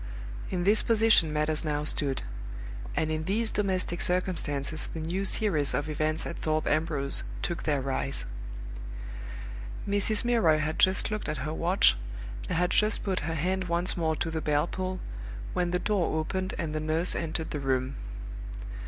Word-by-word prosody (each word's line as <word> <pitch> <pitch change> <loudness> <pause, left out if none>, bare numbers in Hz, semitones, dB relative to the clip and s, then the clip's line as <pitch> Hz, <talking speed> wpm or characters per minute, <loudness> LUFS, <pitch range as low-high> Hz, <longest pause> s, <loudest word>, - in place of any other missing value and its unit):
In 180 -1 -1
this 210 +3 +7
position 225 -8 +4
matters 150 +1 +1
now 150 -1 0
stood; 140 -3 +2 0.7
and 155 0 +1
in 155 0 -1
these 220 +4 0
domestic 185 -4 0
circumstances 155 -5 0
the 165 - -6
new 175 +5 -1
series 170 -9 +1
of 145 - -1
events 155 +1 0
at 170 - -4
Thorpe 155 0 0
Ambrose 155 -3 +3 0.2
took 170 -1 -2
their 145 -3 +2
rise. 135 +1 -2 1.6
Mrs. 205 +2 +2
Milroy 225 -11 +4
had 155 +1 -1
just 190 +3 +4
looked 215 -6 -2
at 150 -3 -2
her 155 - -2
watch, 175 - +4 0.5
and 180 - 0
had 180 +1 +2
just 210 0 +3
put 190 -2 0
her 165 - -1
hand 185 +4 0
once 175 +1 +2
more 160 -2 +1
to 165 - -2
the 160 0 -2
bell 150 0 +2
pull, 185 +1 -3 0.5
when 180 -1 +1
the 180 - +1
door 190 -4 +1
opened 185 +4 -2
and 160 -3 -2
the 155 - 0
nurse 155 +3 +1
entered 160 -1 -2
the 150 - -2
room. 130 -1 0
165 Hz, 165 wpm, -29 LUFS, 155-185 Hz, 1.6 s, this